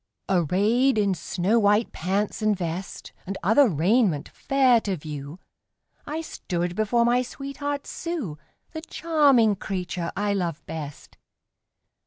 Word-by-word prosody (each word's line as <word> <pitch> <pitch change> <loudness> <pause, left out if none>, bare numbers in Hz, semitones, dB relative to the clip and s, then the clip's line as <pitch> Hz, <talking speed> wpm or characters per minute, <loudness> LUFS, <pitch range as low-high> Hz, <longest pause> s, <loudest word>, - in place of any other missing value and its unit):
Arrayed 205 - +2
in 200 -2 +2
snow 185 +5 0
white 210 +1 +3
pants 195 +6 -2
and 215 -2 +2
vest, 175 +1 -5
And 195 +1 -3
other 225 +8 +5
raiment 175 - +2
fair 260 -4 +3
to 195 -4 -2
view, 150 0 -7 0.7
I 310 +2 -3
stood 175 - -3
before 225 +3 +2
my 245 +1 +3
sweetheart 275 +2 -5
Sue 290 - -5 0.3
The 315 - -6
charming 285 -10 +3
creature 180 -3 -4
I 205 0 +1
love 175 -6 -3
best. 150 -3 -8
205 Hz, 125 wpm, -25 LUFS, 175-250 Hz, 0.7 s, other